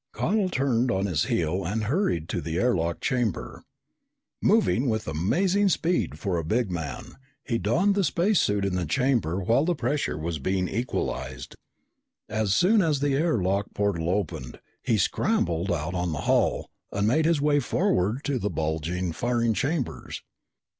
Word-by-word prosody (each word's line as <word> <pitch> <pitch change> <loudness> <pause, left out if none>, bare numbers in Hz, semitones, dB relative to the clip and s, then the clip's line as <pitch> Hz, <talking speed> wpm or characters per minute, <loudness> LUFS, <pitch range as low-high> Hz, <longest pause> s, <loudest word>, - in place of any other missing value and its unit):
Connel 200 0 +1
turned 130 -6 +1
on 95 -4 0
his 85 -4 0
heel 85 +4 0
and 105 +6 -2
hurried 110 - 0
to - - -2
the 80 0 -3
air 125 +6 +2
lock 85 -1 -1
chamber. 120 - -2 0.8
Moving 195 - +3
with 110 -1 -2
amazing 180 - +1
speed 175 0 0
for 95 -4 -2
a - - -3
big 110 +5 0
man, 80 -5 -6 0.3
he 115 -4 -1
donned 175 - +2
the 200 0 +1
space 180 +4 +2
suit 105 -1 +1
in 100 - -1
the 90 -3 -1
chamber 115 - +1
while 115 +8 +3
the 175 +1 +1
pressure 140 - -1
was 80 0 -3
being 95 +5 0
equalized. 65 - -4 0.7
As 110 -2 -1
soon 205 - +4
as 155 -5 +1
the 140 0 +1
air 155 +1 +2
lock 100 +2 -1
portal 95 -5 0
opened, 80 -10 -3 0.2
he 115 - +1
scrambled 85 -1 0
out 80 +1 -2
on 90 -2 -1
the 75 - -3
hull - - +1 0.2
and 100 +1 0
made 155 +7 +2
his 165 -2 +3
way 145 0 +3
forward 130 - 0
to 140 -3 -1
the 105 - -1
bulging 80 +3 -2
firing 115 +4 0
chambers. 135 - -3
110 Hz, 165 wpm, -26 LUFS, 85-145 Hz, 0.8 s, soon